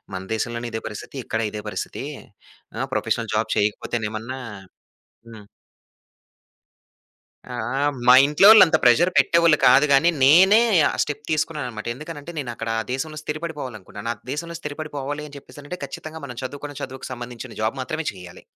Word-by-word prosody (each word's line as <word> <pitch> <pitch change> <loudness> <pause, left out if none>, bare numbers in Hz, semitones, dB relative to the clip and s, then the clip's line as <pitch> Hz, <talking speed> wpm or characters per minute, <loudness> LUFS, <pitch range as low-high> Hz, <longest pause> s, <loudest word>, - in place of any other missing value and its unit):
మన 95 - -4
దేశంలోనే 120 +1 -3
ఇదే 110 - -3
పరిస్థితి, 105 +5 -9
ఇక్కడ 110 - -2
ఇదే 105 -1 -6
పరిస్థితి. - - -5 0.7
ఆహ్, - - -2
ప్రొఫెషనల్ - - -1
జాబ్ - - 0
చేయకపోతేనేమన్నా" 110 +3 -2 0.9
హ్మ్. 110 -3 -12 2.1
ఆహ్, 120 -3 -4 0.2
ఆహ్, 145 0 +2
మా 125 - +9
ఇంట్లోలంత 185 +5 +7
ప్రెషర్ 145 +9 +5
పెట్టేవాళ్ళు 170 -2 +4
కాదు 135 +4 +6
కాని, 140 +5 +5 0.2
నేనే 185 +9 +7 0.3
ఆ - - -1
స్టెప్ 145 0 -4
తీసుకున్నానన్నమాట. 145 -8 -2
ఎందుకనంటే, 155 +3 -8
నేను 135 -5 -4
అక్కడ 115 0 -6
ఆ - - -2
దేశంలో 155 +4 -4
స్థిరపడిపోవాలి 150 -6 -5
అనుకున్నాను. 100 +3 -7
ఆ - - -20 0.2
దేశంలో 170 +3 -5
స్థిరపడిపోవాలి 145 -1 -5
అని 145 - -12
చెప్పేసనంటే, 145 +5 -10
ఖచ్చితంగా 155 +3 -8
మనం 125 -3 -9
చదువుకున్న 145 +2 -7
చదువుకి 130 0 -7
సంబందించిన 120 -1 -8
జాబ్ 110 +5 0
మాత్రమే 160 +4 -4
చేయాలి. 90 -2 -12
140 Hz, 140 wpm, -23 LUFS, 120-155 Hz, 2.1 s, మా